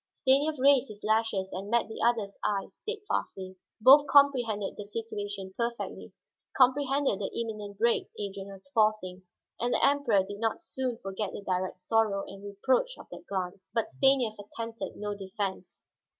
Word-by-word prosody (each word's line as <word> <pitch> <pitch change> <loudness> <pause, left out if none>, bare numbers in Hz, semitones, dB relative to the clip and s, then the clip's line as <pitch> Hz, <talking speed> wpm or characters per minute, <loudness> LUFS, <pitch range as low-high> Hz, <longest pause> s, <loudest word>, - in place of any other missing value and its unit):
Stanief 285 +3 +3
raised 275 0 +5
his 210 -2 -12
lashes 215 -3 0
and 195 +2 -5
met 235 +1 +2
the 220 - -7
other's 225 -4 +1
eyes 200 -2 -2
steadfastly. 295 - -4 0.2
Both 280 +6 +8
comprehended 250 -8 +3
the 205 - -6
situation 205 -2 -5
perfectly, 235 0 -4 0.5
comprehended 270 -2 +3
the 195 - -2
imminent 210 -3 -5
break 235 +2 +2
Adrian 195 -1 -5
was 195 +5 -12
forcing. 205 -5 +1 0.3
And 240 +1 +1
the - - +4
Emperor 275 -9 +3
did 205 +1 -8
not 225 +8 -1
soon 260 -6 -3
forget 195 +1 -3
the - - -7
direct 185 -1 -2
sorrow 200 +1 +1
and 195 0 -11
reproach 255 - 0
of - - -13
that - - -10
glance. 185 -1 -4
But 230 - 0
Stanief 260 -6 +2
attempted 230 +2 -6
no 205 0 -4
defense. 195 -1 -5
215 Hz, 155 wpm, -29 LUFS, 195-255 Hz, 0.5 s, Both